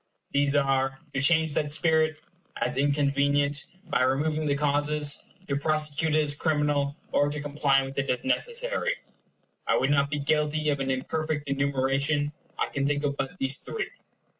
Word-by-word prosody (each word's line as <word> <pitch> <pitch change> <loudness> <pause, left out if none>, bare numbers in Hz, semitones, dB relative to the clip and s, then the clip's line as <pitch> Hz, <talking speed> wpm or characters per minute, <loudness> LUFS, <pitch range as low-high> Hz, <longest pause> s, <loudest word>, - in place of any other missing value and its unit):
These 140 0 +2
are 135 -1 +1 0.2
to 140 - 0
change 160 +1 +3
that 145 0 -1
spirit, 155 0 +2 0.4
as 125 +1 0
inconvenient, 140 0 +2 0.2
by - - +1
removing 150 +4 +1
the 140 - +2
causes; 145 0 +1 0.2
to 140 - -1
prosecute 155 +1 0
it 155 - +4
as 145 -1 +3
criminal; 145 -2 0 0.2
or 145 - +3
to 150 +1 -3
comply 145 -2 +2
with 135 +1 -5
it 135 - -2
as 125 - -1
necessary. - - +1 0.7
I - - +3
would 135 - +1
not 140 -1 +3
be 150 - -2
guilty 150 +1 +1
of 140 - -1
an 135 0 -2
imperfect 150 +3 -2
enumeration; 140 +1 0 0.3
I - - -1
can 140 0 -1
think 145 0 0
of 140 -1 0
but 135 +6 -4
these 135 -2 0
three. 450 - -5
145 Hz, 165 wpm, -27 LUFS, 140-150 Hz, 0.7 s, it